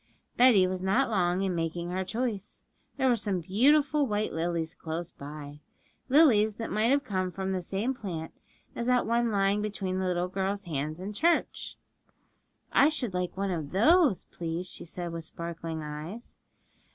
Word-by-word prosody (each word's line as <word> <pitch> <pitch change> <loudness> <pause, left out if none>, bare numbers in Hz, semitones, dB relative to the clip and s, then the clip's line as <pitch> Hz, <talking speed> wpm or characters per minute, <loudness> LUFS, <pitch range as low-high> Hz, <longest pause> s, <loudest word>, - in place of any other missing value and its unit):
Betty 240 -7 +6
was 185 0 -2
not 225 +7 +2
long 180 -2 +1
in 190 -2 0
making 170 +1 -2
her 185 +1 -1
choice. 215 0 -3 0.3
There 265 -1 +2
were 245 - +4
some 205 -4 -1
beautiful 280 - +3
white 210 -1 -1
lilies 165 0 -2
close 165 +1 -5
by 145 0 -9 0.5
lilies 235 -8 +5
that 225 0 -5
might 215 +2 +2
have 280 +1 +3
come 185 -2 -1
from 190 +1 -3
the 185 -1 -1
same 200 +8 -1
plant 175 -10 -6 0.4
as 235 - -3
that 250 -1 +3
one 235 +1 +1
lying 200 0 +2
between 195 -3 -2
the 190 - 0
little 180 0 0
girl's 195 +2 -2
hands 155 -1 -3
in 195 +3 -5
church. 335 +10 0 1.0
'I 285 - +6
should 255 -10 -2
like 180 0 -2
one 195 0 -1
of 160 -4 -4
those, 280 - +4
please,' 170 +1 -4
she - - -6
said, 175 0 -5
with 165 -1 -4
sparkling 165 -1 -5
eyes. 155 +10 -7
190 Hz, 170 wpm, -29 LUFS, 170-230 Hz, 1.0 s, Betty